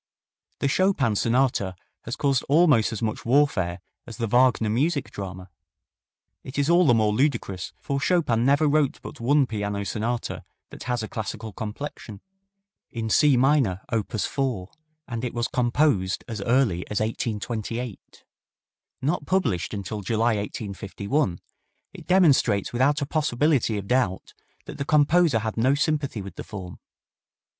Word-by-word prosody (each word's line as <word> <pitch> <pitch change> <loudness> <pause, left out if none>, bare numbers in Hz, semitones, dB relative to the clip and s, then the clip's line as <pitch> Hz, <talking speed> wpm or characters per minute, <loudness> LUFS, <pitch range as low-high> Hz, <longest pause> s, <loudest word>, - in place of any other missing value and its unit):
The - - +2
Chopin 140 - +2
sonata 115 -5 +1 0.3
has 115 - -4
caused 135 -3 +1
almost 145 -8 +4
as 110 0 -4
much 110 -1 -2
warfare 115 -10 +1 0.3
as 115 - -9
the 115 - -1
Wagner 120 0 +3
music 140 +6 0
drama. 95 -2 -7 0.9
It 130 - -8
is 145 +3 +2
all 175 -1 +5
the 120 - +5
more 110 -2 +2
ludicrous, 105 -7 -1
for 140 0 -2
Chopin 150 -10 +2
never 140 +4 +3
wrote 145 -1 +1
but - - -9
one 140 +4 +3
piano 105 -3 -3
sonata 115 +4 -3 0.3
that - - -10
has 125 -2 -1
a - - -4
classical 110 0 -5
complexion: 110 -1 -7 0.7
in 110 -1 -4
C 145 0 +5
minor, 130 -8 +2
op. 110 -3 0
4, 115 -3 -2 0.4
and 115 -2 -5
it 125 - -3
was 120 0 0
composed 125 -6 +1
as 110 -4 -5
early 115 -5 +2
as 105 - -1
1828. 115 +1 -4 0.8
Not 145 0 -1
published 130 - 0
until 105 0 -5
July, 110 +3 +1
1851, 100 - -3 0.5
it - - -12
demonstrates 140 - +3
without 140 +4 +2
a - - -1
possibility 145 -5 +1
of 100 - -5
doubt 120 -7 0 0.3
that - - -9
the - - 0
composer 150 0 +3
had 110 0 -3
no 130 +5 +3
sympathy 145 -7 -1
with 100 - -10
the - - -5
form. 95 -4 -8
120 Hz, 145 wpm, -25 LUFS, 105-140 Hz, 0.9 s, all